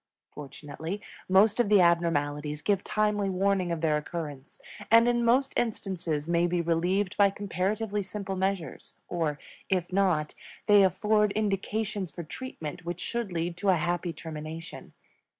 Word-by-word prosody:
Fortunately, 150 Hz, +5 st, -7 dB, 0.3 s
most 205 Hz, +4 st, +5 dB
of 240 Hz, -, +3 dB
the 210 Hz, -2 st, +6 dB
abnormalities 150 Hz, -4 st, +1 dB
give 200 Hz, 0 st, +1 dB
timely 210 Hz, -2 st, 0 dB
warning 190 Hz, -1 st, +1 dB
of 165 Hz, -2 st, -2 dB
their 155 Hz, -2 st, +2 dB
occurrence, 150 Hz, -2 st, -6 dB, 0.3 s
and 230 Hz, +1 st, +7 dB
in 240 Hz, 0 st, +2 dB
most 255 Hz, +4 st, +3 dB
instances 180 Hz, -9 st, -2 dB
may 170 Hz, 0 st, +2 dB
be 175 Hz, 0 st, 0 dB
relieved 175 Hz, +4 st, 0 dB
by 200 Hz, -1 st, +6 dB
comparatively 205 Hz, +2 st, -2 dB
simple 195 Hz, 0 st, -5 dB
measures; 190 Hz, -2 st, -3 dB
or, 160 Hz, -4 st, -1 dB, 0.3 s
if 180 Hz, -1 st, 0 dB
not, 180 Hz, -6 st, +2 dB, 0.3 s
they 205 Hz, -1 st, +7 dB
afford 210 Hz, +2 st, +3 dB
indications 205 Hz, -1 st, -1 dB
for 170 Hz, -, -7 dB
treatment 165 Hz, -, -7 dB
which 175 Hz, +1 st, -4 dB
should 235 Hz, -2 st, -3 dB
lead 170 Hz, 0 st, -2 dB
to 200 Hz, +2 st, 0 dB
a 185 Hz, -, +6 dB
happy 175 Hz, +1 st, -1 dB
termination. 160 Hz, 0 st, -8 dB
185 Hz, 145 wpm, -28 LUFS, 165-205 Hz, 0.3 s, and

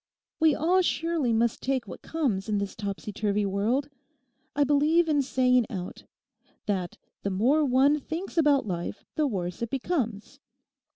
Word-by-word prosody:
We 315 Hz, -2 st, +4 dB
all 355 Hz, +5 st, +3 dB
surely 330 Hz, -7 st, 0 dB
must 230 Hz, 0 st, +1 dB
take 260 Hz, -4 st, -1 dB
what 180 Hz, -, -9 dB
comes 240 Hz, -12 st, -2 dB
in 210 Hz, -, +1 dB
this 200 Hz, -1 st, -3 dB
topsy 205 Hz, 0 st, -5 dB
turvy 205 Hz, 0 st, 0 dB
world. 210 Hz, +8 st, 0 dB, 0.7 s
I 290 Hz, -, +3 dB
believe 300 Hz, +4 st, +3 dB
in 295 Hz, -2 st, +3 dB
saying 250 Hz, -2 st, +2 dB
out:—that 185 Hz, 0 st, -7 dB, 0.2 s
the 200 Hz, -, -2 dB
more 245 Hz, +11 st, +2 dB
one 280 Hz, +2 st, +3 dB
thinks 330 Hz, +7 st, -6 dB
about 295 Hz, -6 st, +3 dB
life 175 Hz, 0 st, -4 dB
the 305 Hz, -1 st, +1 dB
worse 180 Hz, -6 st, -4 dB
it 235 Hz, -, -2 dB
becomes. 255 Hz, -, -3 dB
255 Hz, 150 wpm, -27 LUFS, 205-295 Hz, 0.7 s, We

